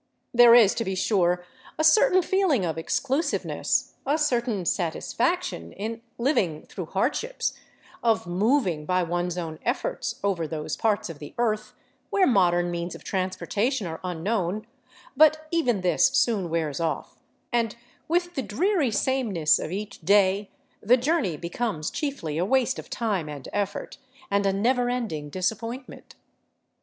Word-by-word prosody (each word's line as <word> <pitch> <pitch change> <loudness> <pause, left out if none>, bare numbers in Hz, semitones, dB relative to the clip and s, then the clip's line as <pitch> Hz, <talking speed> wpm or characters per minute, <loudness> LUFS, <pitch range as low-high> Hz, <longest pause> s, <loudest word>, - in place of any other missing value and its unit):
There 240 -1 +8
is, 220 -5 +7
to 230 - -2
be 190 -3 -2
sure, 180 -3 +1 0.3
a 315 - 0
certain 365 +2 +5
feeling 360 - +2
of 160 - -2
exclusiveness, 275 - -1
a 285 +3 +1
certain 240 - 0
satisfaction 160 - -1
in 225 +3 -5 0.2
liv 270 +6 +2
ing 160 -5 -2
through 180 -4 -7
hardships, 295 - -1 0.5
of 225 -4 +2
moving 180 - +1
by 185 0 +2
one's 175 +1 -2
own 160 -3 -5
efforts - - -2
over 185 -5 0
those 155 -1 -4
parts 215 -2 0
of 150 - -12
the 145 - -10
earth 215 -2 -1 0.3
where 390 -2 +3
modern 175 - +3
means 170 0 -4
of - - -12
transportation 200 +5 -1
are 160 -1 -5
unknown; 185 +3 -2 0.5
but 310 +2 +5
even 250 - +1
this 180 +6 +4
soon 230 -9 +1
wears 160 -3 -1
off, 165 -2 -3 0.3
and 230 -2 +1 0.3
with 350 +1 0
the 270 - -2
dreary 305 - +1
sameness 215 - +2
of 155 - -5
each 205 +2 -5
day 200 +2 +3 0.3
the 240 +4 +5
journey 255 - 0
becomes 170 -1 -3
chiefly 270 - -3
a - - +2
waste 260 +4 +1
of - - -10
time 200 -9 -2
and 145 -3 -8
effort, 200 -1 -3 0.3
and 200 0 +2
a - - +3
never 245 +5 +1
ending 215 -13 -3
disappointment. 230 - -4
205 Hz, 150 wpm, -26 LUFS, 175-255 Hz, 0.5 s, There